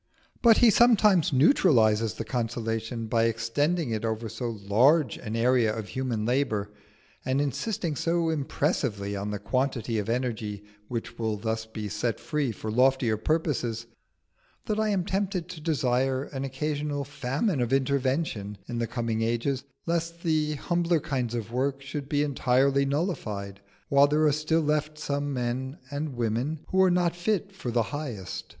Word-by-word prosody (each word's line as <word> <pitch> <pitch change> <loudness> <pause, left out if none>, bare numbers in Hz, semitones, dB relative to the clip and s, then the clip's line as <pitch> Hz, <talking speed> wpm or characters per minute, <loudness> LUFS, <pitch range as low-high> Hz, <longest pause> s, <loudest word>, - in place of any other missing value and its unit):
But 230 -2 +7
he 235 -2 +6
sometimes 210 -7 +5
neutralises 115 - +4
the - - -5
consolation 115 -1 -2
by 115 +1 +2
extending 120 +7 0
it 110 -1 -2
over 110 0 -2
so 115 +2 -4
large 125 +6 +4
an 110 -1 -5
area 120 -1 +3
of 110 -2 -5
human 125 -5 -2
labour, 110 -5 0 0.5
and 130 +1 0
insisting 160 - -1
so 165 +2 +1
impressively 135 - -1
on 100 +1 -3
the 105 - -2
quantity 120 +1 -1
of 105 +1 -3
energy 110 -4 -2 0.2
which 115 0 -5
will 110 -2 -1
thus 110 +1 -3
be 110 -1 -5
set 115 +3 -2
free 150 -5 -1
for 110 0 -5
loftier 125 -1 +3
purposes, 120 -3 -1 0.8
that 215 0 -1
I 220 0 +1
am 190 -4 0
tempted 190 -3 -1
to 175 -4 -8
desire 135 -4 +1
an 135 -2 -5
occasional 145 +1 -2
famine 140 - -1
of 120 0 -1
invention 135 -6 0
in 120 -1 -3
the 115 - 0
coming 115 -2 -2
ages, 120 +4 -1 0.2
lest 170 0 -2
the 155 -2 +1
humbler 170 +2 +1
kinds 125 -5 -2
of 115 -1 -4
work 135 +2 0
should 140 0 -5
be 145 0 +2
entirely 140 0 +2
nullified 105 - -3 0.3
while 140 0 +5
there 150 +2 +2
are 150 - +5
still 155 +3 +1
left 150 0 0
some 145 -1 -2
men 130 +2 -2
and 145 -1 -3
women 120 +7 -1
who 190 - +3
are 190 - +6
not 175 -1 +2
fit 200 +2 -1
for 130 - -5
the 120 -1 +2
highest. 125 - -5
130 Hz, 160 wpm, -27 LUFS, 115-155 Hz, 0.8 s, But